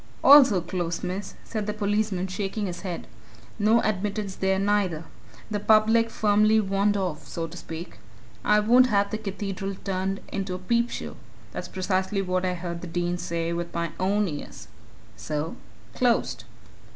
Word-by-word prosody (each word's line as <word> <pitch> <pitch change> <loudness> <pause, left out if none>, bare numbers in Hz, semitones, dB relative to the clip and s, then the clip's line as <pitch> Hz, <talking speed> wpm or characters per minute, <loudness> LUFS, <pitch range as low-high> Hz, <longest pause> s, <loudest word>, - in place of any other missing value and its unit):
"Also 265 -9 +8
closed, 175 -1 -3
miss," 185 +3 -4
said 215 -2 -4
the 210 - -1
policeman, 205 -2 0
shaking 195 +2 -3
his 175 -2 -5
head. 180 -4 -5 0.5
"No 220 +3 +4
admittance 205 -1 -2
there, 190 0 +1
neither. 195 -5 +1 0.5
The 205 - 0
public 220 +2 +4
firmly 215 0 +3
warned 200 0 +1
off 180 -6 -3
so 165 - -3
to 165 +1 -9
speak. 165 0 -8 0.4
'I 210 0 +4
won't 245 +4 +6
have 200 -3 +2
the 215 - -2
Cathedral 195 -1 -4
turned 195 0 -2
into 195 -2 -3
a - - -3
peepshow!' 235 +6 -1 0.3
that's - - -5
precisely 190 +1 -1
what 185 0 0
I 180 -1 0
heard 170 -1 -5
the 180 - -6
Dean 175 +1 -1
say 170 0 -2
with 170 0 -4
my 170 -1 -1
own 200 +2 +2
ears. 150 -4 -7 0.5
So 150 +8 -3 0.4
closed!" 245 -2 +1
195 Hz, 155 wpm, -26 LUFS, 180-210 Hz, 0.5 s, Also